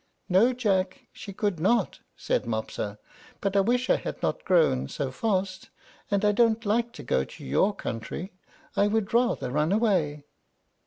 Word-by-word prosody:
"No, 195 +7 +4
Jack, 195 -7 -1
she 200 - -9
could 200 -3 -1
not," 200 +4 +1 0.2
said - - -1
Mopsa; 110 -2 -3 0.4
"but 195 0 -2
I - - +5
wish 245 +5 +1
I - - +4
had - - -6
not - - -1
grown 160 - +3
so 135 - -3
fast, 190 - -2 0.4
and 200 +1 +1
I 210 - +5
don't 230 +1 +2
like 230 +3 +1
to 145 - -9
go 65 - +1
to - - -11
your 190 - +2
country. 160 - -5 0.4
I 205 - +3
would 215 -1 -1
rather 240 - +1
run 150 +5 +1
away." 180 -10 +1
195 Hz, 165 wpm, -27 LUFS, 150-220 Hz, 0.4 s, I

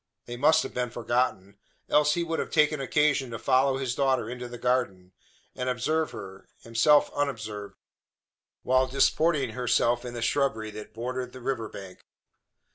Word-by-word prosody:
They 120 - -6
must 155 +5 +4
have - - -7
been 125 -1 -2
forgotten, 115 -4 -2 0.3
else 150 0 +3
he 170 - 0
would 165 -1 -2
have - - -3
taken 150 -2 +2
occasion 140 -1 +1
to 115 - -5
follow 130 +1 +2
his 130 -2 -2
daughter 130 -4 +1
into 125 0 -6
the 120 0 -8
garden, 115 -7 -1 0.4
and 125 0 -2
observe 150 +6 0
her 95 0 -10
himself 115 +6 +3
unobserved 110 -8 -4 0.9
while 130 0 +3
disporting 135 0 +2
herself 120 0 +1
in 120 -1 -7
the 120 - -3
shrubbery 115 -4 0
that 105 +1 -10
bordered 125 +2 -4
the 130 - -9
river 115 -4 -2
bank. 95 -2 -10
125 Hz, 160 wpm, -27 LUFS, 115-140 Hz, 0.9 s, must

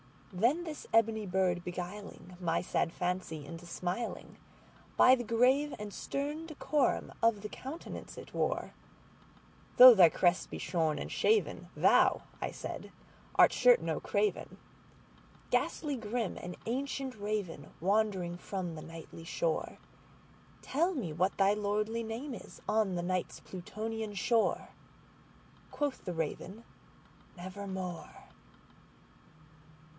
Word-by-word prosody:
Then 240 - +2
this 315 -3 -7
ebony 225 -2 +3
bird 180 -1 +1
beguiling 180 0 -7
my 170 -2 0
sad 175 -1 -1
fancy 175 -4 -3
into 165 +1 -9
smilingBy 185 +7 0
the 245 -2 -5
grave 255 +6 +3
and 210 -1 -7
stern 295 +4 -3
decorum 300 -3 0
of 230 -3 +3
the 210 - -5
countenance 275 +9 -8
it - - -10
wore,—"Though 250 0 +3
thy 180 -6 +8
crest 175 +2 +2
be - - -6
shorn 160 -4 0
and - - -5
shaven, 435 0 +1
thou," - - +4 0.2
I - - -1
said, - - -7 0.4
"art - - +7
sure - - +6
no - - -2
craven, 420 - -1 0.9
Ghastly 290 -4 0
grim 225 -1 -2
and 175 0 -7
ancient 265 +1 -3
Raven 205 -8 -3
wandering 190 -3 +1
from 180 -2 -4
the 155 - -7
Nightly 165 0 -10
shore:Tell 270 - -4
me 205 - -3
what 185 +5 0
thy 195 +1 +4
lordly 210 +2 -1
name 235 +5 -5
is - - -10
on 210 -3 +2
the 175 - -2
Night's 185 0 -2
Plutonian 215 +3 -5
shore!"Quoth 240 +5 -3
the 180 - -3
Raven, 175 +6 -4 0.7
"Nevermore." 185 -2 -6
205 Hz, 115 wpm, -32 LUFS, 180-245 Hz, 0.9 s, thy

